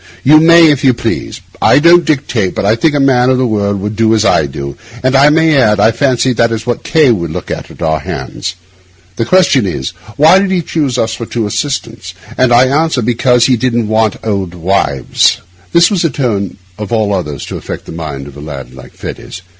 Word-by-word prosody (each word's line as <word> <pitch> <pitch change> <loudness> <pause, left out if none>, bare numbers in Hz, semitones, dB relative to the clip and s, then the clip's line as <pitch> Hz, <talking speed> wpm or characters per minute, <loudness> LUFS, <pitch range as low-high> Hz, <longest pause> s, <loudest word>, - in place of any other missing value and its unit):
You 155 +3 +6
may, 165 0 +6
if 140 - -2
you 130 -3 +3
please. - - -4 0.2
I - - +4
don't 170 +3 +5
dictate, 125 -10 -1
but - - -2
I 105 +2 +3
think 145 +6 0
a - - +1
man 130 -2 +3
of 130 - +2
the 130 - +1
world 100 -3 -1
would 105 +2 -4
do 115 0 +2
as 110 0 +1
I 75 - +2
do; 70 0 -7 0.3
and 130 +1 +1
I 140 +2 +5
may 160 0 +3
add, 105 -6 +3
I 110 +2 +4
fancy 130 +1 0
that 115 0 +1
is 115 0 -4
what 120 -2 -2
K— 155 -6 +3
would 85 -7 -2
look 80 - -6
for - - -1
at - - -8
our 80 -1 0
hands. 70 +6 -6 0.6
The 115 - -1
question 140 - +3
is, 65 -7 -4 0.3
Why 160 +6 +5
did 195 0 -1
he 185 -3 0
choose 145 -6 -2
us 110 -2 -1
two 115 - -5
for 120 - -5
his 105 -2 -3
assistants? 115 - -4 0.2
And 130 -1 +1
I 120 +2 +5
answer, 140 -1 0
because 120 +1 +2
he 130 - +3
didn't 120 -2 -1
want 110 -1 +1
old 95 -5 -3
wives.' 85 -7 0 0.3
This 170 +3 +4
was 190 -4 0
the 165 - +1
tone 110 -9 -3 0.2
of 105 0 -6
all 110 -3 0
others 75 -7 -4
to - - -6
affect - - -8
the - - -10
mind 75 -4 -6
of 70 -1 -12
a 75 - -10
lad 70 -4 -8
like 65 -1 -13
Fettes. 95 - -8
115 Hz, 225 wpm, -12 LUFS, 100-140 Hz, 0.6 s, You